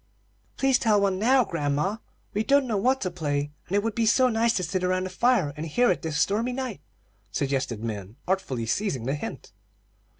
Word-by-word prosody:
"Please 270 -2 +3
tell 215 -3 +3
one 195 -2 +1
now, 255 +4 +4
grandma. 150 +5 -1 0.4
We 210 - 0
don't 280 +3 +3
know 230 -4 -1
what 255 +7 +2
to 185 - -1
play, 145 -4 -2 0.2
and 190 - -2
it 205 - +2
would 225 -1 -1
be 230 0 +1
so 255 +3 +4
nice 230 0 +2
to 185 - -1
sit 185 +2 -2
around 185 0 +1
the 185 - -5
fire 195 - +2
and 155 +2 -5
hear 240 +10 +3
it 180 - -1
this 155 -2 -2
stormy 225 +8 +1
night," 250 - -4 0.5
suggested 130 -5 -2
Min, 105 -2 -5
artfully 180 -11 -1
seizing 135 - -1
the 135 - 0
hint. 145 - -6
190 Hz, 200 wpm, -26 LUFS, 145-230 Hz, 0.5 s, now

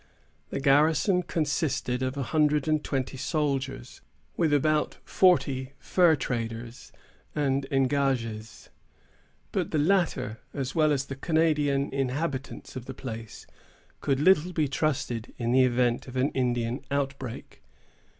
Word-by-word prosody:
The - - -3
garrison 155 +6 +3
consisted 145 -6 -1
of 130 +1 -2
a 140 - -1
hundred 150 0 +2
and 155 -1 +1
twenty 135 -1 -2
soldiers, 135 -2 -2 0.3
with 165 -3 +1
about 150 +1 +2
forty 140 -8 +2
fur 175 -3 +3
traders 115 -2 -5 0.4
and 140 -2 0
engagés; 130 -5 -1 0.8
but - - -1
the - - -1
latter, 150 - +1 0.2
as 135 -2 -3
well 155 -2 +3
as 140 -2 0
the 135 - -6
Canadian 150 -2 +1
inhabitants 135 0 -3
of 125 -2 -6
the 130 - -7
place, 115 -4 -7 0.5
could 135 -1 0
little 180 +2 +4
be 155 -3 +1
trusted, 135 -5 -2
in 120 -1 -1
the 130 +1 +5
event 120 0 +1
of 125 - -9
an 130 +3 +2
Indian 120 -1 -1
outbreak. 135 -3 -4
135 Hz, 130 wpm, -27 LUFS, 125-150 Hz, 0.8 s, the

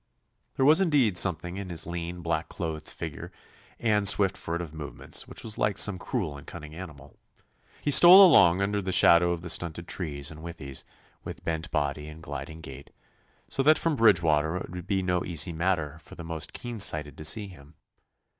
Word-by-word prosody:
There 130 - +1
was 155 +6 +5
indeed 140 - +2
something 90 0 +1
in 100 -2 -7
his 85 -2 -3
lean, 85 +1 -6
black 80 -1 -2
clothed 80 -2 -5
figure 75 -5 -8 0.5
and 105 -3 +1
swift 100 -1 +5
furtive 85 -2 -5
movements 75 -3 -5
which - - -10
was 110 -2 -4
like 105 - 0
some 100 -3 +3
cruel 90 - -4
and - - -17
cunning 75 0 -10
animal. 75 -5 -12 0.6
He 145 - 0
stole 180 +6 +9
along 95 - +5
under 100 -1 -2
shadow 85 -1 +5
of 85 -1 -4
the 90 - -7
stunted 85 0 -3
trees 70 -6 -4
and 80 0 -12
withies, 80 -5 -8 0.4
with - - -9
bent 80 +1 -3
body 75 0 -3
and 80 +1 -12
gliding 80 0 -8
gait, 70 -2 -12 0.6
so - - -2
that 155 +3 +4
from 165 -2 -1
Bridgewater 85 - +2
it - - -8
would 90 -1 -8
be 95 -1 -1
no 90 -1 -1
easy 85 -1 0
matter 80 -3 -2
for - - -15
the 85 - -9
most 80 -1 -6
keen 120 -2 -8
sighted 75 -6 +1
to - - -7
see 105 +6 +1
him. 80 -5 -16
85 Hz, 185 wpm, -26 LUFS, 80-100 Hz, 0.6 s, stole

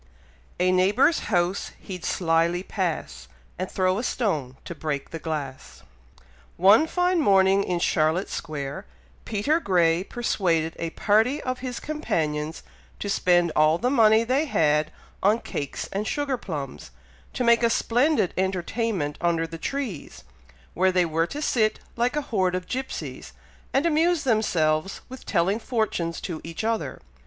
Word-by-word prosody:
A 180 +1 +3
neighbour's 205 - +3
house 180 -1 0
he'd 180 -3 -8
slyly 170 +1 +1
pass, 160 - -3 0.3
And 185 - -2
throw 185 +1 +1
a - - -3
stone 155 - -1
to 170 - -5
break 150 -3 -4
the 165 - -5
glass. 145 -5 -6 0.7
One 205 - +6
fine 360 +1 +1
morning 195 -6 +4
in 180 -2 -1
Charlotte 160 +2 +1
Square, 145 -4 -5 0.4
Peter 255 +10 +1
Grey 175 - +2
persuaded 175 -8 0
a 165 - -2
party 220 - +2
of 255 0 -3
his 250 -1 -5
companions 160 - -2 0.3
to 205 - -4
spend 175 -3 +3
all 155 +1 +4
the 245 +7 0
money 220 -3 +5
they 260 +6 +1
had 150 - +2 0.3
on 210 +3 +4
cakes 145 -10 -5
and 205 +2 -2
sugar 290 -2 -1
plums, 145 - -6 0.4
to 250 - -1
make 235 0 +5
a 235 - +3
splendid 245 - +2
entertainment 190 -3 -1
under 170 -1 +1
the 165 0 -8
trees, 235 - -5 0.5
where 185 +2 +3
they 180 -1 +3
were 165 +1 0
to 295 +10 -5
sit 220 -7 +1 0.2
like 240 +3 0
a 295 - +1
horde 190 -9 0
of 185 0 -3
gypsies, 265 +6 -5 0.4
and 275 +4 +1
amuse 335 +1 +2
themselves 190 - +1
with 260 0 -11
telling 195 +3 +1
fortunes 215 -9 -2
to 165 -4 -5
each 165 +5 -6
other. 225 0 -2
190 Hz, 145 wpm, -25 LUFS, 165-235 Hz, 0.7 s, One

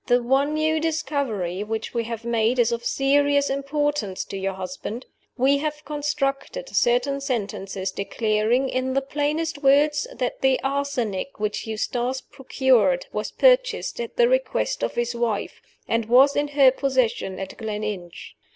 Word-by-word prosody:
"The 245 -1 +3
one 275 +4 +2
new 315 +1 +1
discovery 265 - -2
which 220 +1 -4
we 235 -1 -1
have 230 0 -6
made 235 +1 +1
is 240 -1 +3
of 235 0 -2
serious 285 +2 +2
importance 275 -7 -1
to - - -7
your 195 0 -2
husband. 190 +6 -6 0.3
We 275 +2 +3
have 300 0 -2
reconstructed 295 - -3
certain 250 +4 +2
sentences 195 -7 -3
declaring, 215 +5 0
in 260 0 -2
the 275 - +1
plainest 295 +2 -2
words, 290 +1 +3
that 250 -1 -3
the 265 -1 +3
arsenic 270 -6 -2
which 210 +1 -2
Eustace 245 +4 -2
procured 250 -10 +1
was 210 - -3
purchased - - +2
at 470 - -6
the 480 -1 +5
request - - 0
of - - -2
his 240 0 -1
wife, 235 -3 -2 0.3
and 230 0 0
was 260 +5 +5
in 290 0 +1
her 280 -2 +5
possession 255 -8 0
at 195 - -6
Gleninch. 210 -5 -5
260 Hz, 150 wpm, -24 LUFS, 220-285 Hz, 0.3 s, the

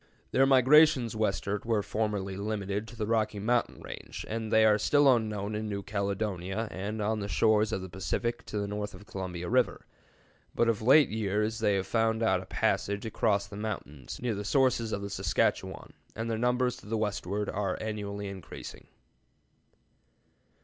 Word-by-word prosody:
Their 135 +1 +4
migrations 135 -2 +5
westward 105 -1 -1
were 115 -3 +1
formerly 105 -3 -2
limited 100 +1 -3
to 115 - -11
the 110 -2 -2
Rocky 110 -1 0
Mountain 120 +4 0
range, - - -8
and 110 0 -4
they 110 0 +6
are 105 -1 +5
still 145 +3 +5
unknown 105 -2 -2
in 105 0 -3
New 100 -1 -3
Caledonia 100 0 -2
and 105 +3 -4
on 110 +1 0
the 100 - -3
shores 110 0 +3
of 95 - -2
the - - -6
Pacific 115 +6 -2
to - - -4
the 100 -1 -1
north 105 0 -4
of - - -13
the 115 - -22
Columbia 90 -2 -4
River; 125 +2 +1 0.7
but 120 - +3
of 115 -2 +1
late 140 +6 +6
years 105 +1 -1
they 105 -2 +2
have 95 -1 -1
found 115 0 +1
out 95 -4 +2
a 95 - -12
passage 100 +2 0
across 105 -2 +1
the 100 0 -10
mountains 90 - -6
near 120 -2 -1
the 100 0 -4
sources 120 -1 +2
of 100 - -2
the 100 - -4
Saskatchewan, - - -1 0.2
and 115 +1 -3
their 110 - -1
numbers 125 +1 +1
to - - -14
the 110 +1 -1
westward 105 -1 -2
are 100 -2 -2
annually 105 -2 -4
increasing. 95 -4 -9
105 Hz, 175 wpm, -29 LUFS, 100-115 Hz, 0.7 s, they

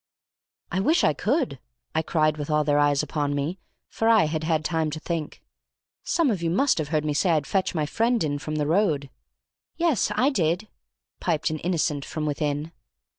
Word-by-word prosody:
"I 185 - 0
wish 315 - +3
I 155 - +4
could," 245 - -1 0.3
I - - +2
cried 155 -1 +1
with 145 0 -5
all 150 0 +2
their 145 0 +2
eyes 145 0 +3
upon 145 -2 -1
me, 150 +6 -2 0.3
for 225 - 0
I 225 -2 +6
had 155 0 -2
had 155 -1 0
time 160 -2 0
to 155 +1 -5
think. 165 -2 -4 0.6
"Some 325 -7 +2
of 190 -5 -2
you 165 - 0
must 255 +5 +2
have 155 - -2
heard 155 0 0
me 150 - 0
say 175 +5 +1
I'd 155 -4 +2
fetch 190 +1 0
my 155 -2 +1
friend 230 +7 +1
in 145 -2 -1
from 155 +2 -4
the 150 -1 0
road?" 155 -5 +1 0.7
"Yes, 320 - +1
I 270 +6 +3
did," 180 - 0 0.5
piped 160 -3 0
an 155 - -3
innocent 160 -4 0
from 155 +2 -4
within. 150 +1 -2
155 Hz, 195 wpm, -25 LUFS, 150-190 Hz, 0.7 s, I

